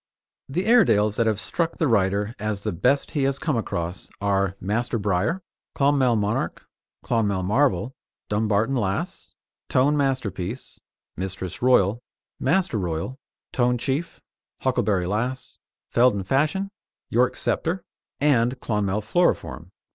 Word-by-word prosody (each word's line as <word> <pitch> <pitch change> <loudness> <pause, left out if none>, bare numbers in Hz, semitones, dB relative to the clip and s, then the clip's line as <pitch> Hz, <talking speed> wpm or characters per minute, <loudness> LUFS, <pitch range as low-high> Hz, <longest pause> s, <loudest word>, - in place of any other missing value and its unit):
The 175 +8 -1
Airedales 105 - +4
that 115 - +2
have 110 -2 +1
struck 165 +7 -1
the 160 - +2
writer 100 -1 +1
as 105 -1 -2
the - - -1
best 140 +11 +1
he 145 - -1
has 135 0 +1
come 150 -1 -1
across 90 -5 -3
are 100 -2 +1
Master 115 +5 -1
Briar, 105 - 0 0.3
Clonmel 140 -4 +3
Monarch, 105 -1 -1 0.4
Clonmel 100 -5 +1
Marvel, 115 +1 +1 0.3
Dumbarton 110 +4 +1
Lass, 100 -5 -2 0.3
Tone 140 +4 +3
Masterpiece, 130 -6 -2 0.4
Mistress 95 0 -5
Royal, 120 -3 +4 0.4
Master 170 - +1
Royal, 90 - -3 0.3
Tone 125 -1 +2
Chief, 135 +7 -2 0.4
Huckleberry 95 -4 +1
Lass, 120 +7 -3 0.3
Fielden 120 -5 +4
Fashion, 155 - +1 0.4
York 125 +2 +3
Sceptre 175 +2 -1 0.4
and 130 -3 +2
Clonmel 105 -2 -1
Floriform. 175 +11 0
115 Hz, 120 wpm, -24 LUFS, 100-135 Hz, 0.4 s, Airedales